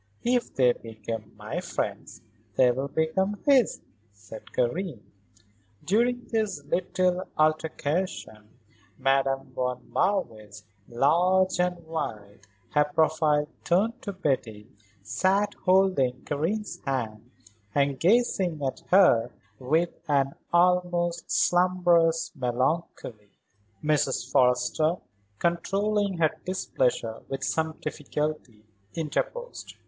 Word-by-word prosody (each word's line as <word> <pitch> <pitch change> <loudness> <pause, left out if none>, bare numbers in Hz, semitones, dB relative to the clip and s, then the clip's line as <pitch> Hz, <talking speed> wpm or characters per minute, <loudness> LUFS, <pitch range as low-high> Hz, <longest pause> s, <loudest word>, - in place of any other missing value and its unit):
"If 245 0 0
they 125 -2 +5
become 110 -1 -7
my - - -4
friends - - -4 0.3
they 125 0 +5
will 135 +3 -2
become 190 +7 0
his," 270 -5 +4 0.3
said 105 +2 -12
Karen. 130 - -2 0.8
During 240 +5 +1
this 215 -10 -1
little 180 +3 0
altercation, 155 - -1 0.5
Madame 135 -1 +1
von 125 -1 -3
Marwitz, 110 - -1 0.3
large 180 +9 +3
and 180 -1 -1
white, 105 -11 -6 0.2
her 150 0 +3
profile 150 0 +2 0.2
turned 220 +8 +1
to 200 - -4
Betty, 130 - -2 0.3
sat 195 - +1
holding 185 -9 +3
Karen's 180 +9 -2
hand 115 -4 -3 0.5
and 140 -2 +1
gazing 185 - +2
at 130 - -3
her 150 -12 +5 0.3
with 160 +7 +1 0.2
an 140 -2 +2 0.2
almost 175 -1 +2
slumbrous 175 -2 +3
melancholy. 125 -4 -2 0.5
Mrs. 140 -4 0
Forrester, 125 +6 +2 0.4
controlling 195 - 0
her 160 -2 +3
displeasure 125 -10 -1
with 135 0 -4
some 160 +1 -1
difficulty, 150 -6 -4 0.3
interposed. 485 - -4
155 Hz, 95 wpm, -27 LUFS, 125-185 Hz, 0.8 s, they